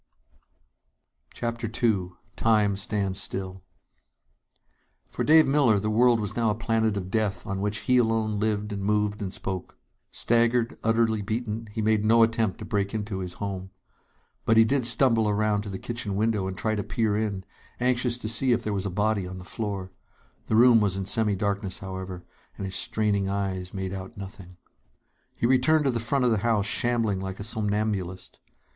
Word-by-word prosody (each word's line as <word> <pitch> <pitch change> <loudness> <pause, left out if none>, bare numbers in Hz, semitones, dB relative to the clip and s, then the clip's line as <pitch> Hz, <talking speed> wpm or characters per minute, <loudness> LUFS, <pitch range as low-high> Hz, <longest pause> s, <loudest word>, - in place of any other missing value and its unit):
_" - - -19
CHAPTER 115 0 -3
II 110 -6 0 0.2
Time 105 -3 +2
Stands 100 -1 -1
Still 95 -1 -4 1.5
For - - -2
Dave 155 +1 +6
Miller, 135 -7 +3
the 105 +2 -1
world 120 +1 +4
was 105 -2 -3
now 115 -2 +2
a 105 - 0
planet 110 -2 0
of 95 -1 -5
death 105 -3 -1
on 100 -2 -3
which 105 +1 -1
he 125 - +3
alone 110 -3 +1
lived 105 -1 -1
and 100 - -4
moved 105 0 0
and 95 -2 -3
spoke. 95 -2 -6 0.3
Staggered, 120 0 +1
utterly 115 -1 +2
beaten, 110 +1 -3
he 110 +1 -3
made 110 -1 +2
no 115 +1 +5
attempt 115 -4 +1
to - - -8
break 100 0 -1
into 105 -2 -3
his 90 -1 -5
home. 95 -2 -5 0.7
But 115 - +3
he 115 - +7
did 130 0 +1
stumble 115 -3 +3
around 105 0 +1
to 105 - -7
the 95 - -4
kitchen 115 -2 -4
window 105 -2 0
and 95 -1 -5
try 110 +2 -1
to 105 -1 -2
peer 105 0 0
in, 105 -3 -2 0.3
anxious 125 -1 +1
to 115 - -6
see 120 +3 +2
if - - -1
there 105 - -2
was 100 0 -2
a - - -2
body 105 0 0
on 95 0 -7
the 90 - -9
floor. 100 -2 -4 0.6
The - - +1
room 120 0 +7
was 100 -2 +1
in 95 - -3
semi 105 +1 +1
darkness, 100 -1 -2
however, 95 -2 -7 0.3
and 100 - -4
his 95 - -4
straining 100 -3 +1
eyes 95 -2 -2
made 95 -1 -4
out 95 +4 -7
nothing. 95 -2 -10 0.8
He - - 0
returned 130 +5 +3
to 135 - +3
the 120 - -1
front 125 +3 0
of 120 - +3
the 110 - +2
house, 110 -2 +1
shambling 115 -2 +1
like 95 0 -5
a - - -4
somnambulist. 105 -4 -2
105 Hz, 185 wpm, -26 LUFS, 100-115 Hz, 1.5 s, he